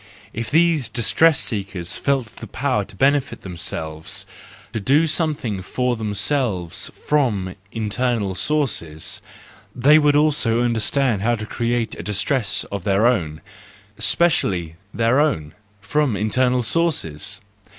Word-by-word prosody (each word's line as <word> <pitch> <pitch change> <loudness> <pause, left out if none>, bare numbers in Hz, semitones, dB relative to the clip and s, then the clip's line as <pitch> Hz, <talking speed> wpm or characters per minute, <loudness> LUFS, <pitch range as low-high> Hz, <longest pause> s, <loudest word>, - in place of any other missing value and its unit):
If 115 0 -4
these 160 -4 +3
distress 145 +6 +3
seekers 95 -6 -1
felt 130 -5 -1
the 115 - -8
power 130 -1 -1
to - - -13
benefit 135 -4 +1
themselves, 80 -4 -4 0.5
to 115 - -1
do 140 +10 +3
something 150 - -1
for 125 +6 -1
themselves 105 - -1 0.2
from 110 -11 +1 0.2
internal 115 -2 -1
sources, 95 - -1 0.5
they 145 +5 +6
would 145 -1 +3
also 145 -6 +2
understand 120 -1 +1
how 120 +3 +2
to 110 -1 -6
create 120 0 -1
a - - -3
distress 105 +2 0
of 100 -3 -4
their 100 +3 +2
own, 85 -11 +1 0.6
specially 105 - +1 0.2
their 115 +5 +2
own, 80 - 0 0.3
from 130 +1 0
internal 125 +4 +1
sources. 110 - -1
115 Hz, 120 wpm, -21 LUFS, 100-140 Hz, 0.6 s, they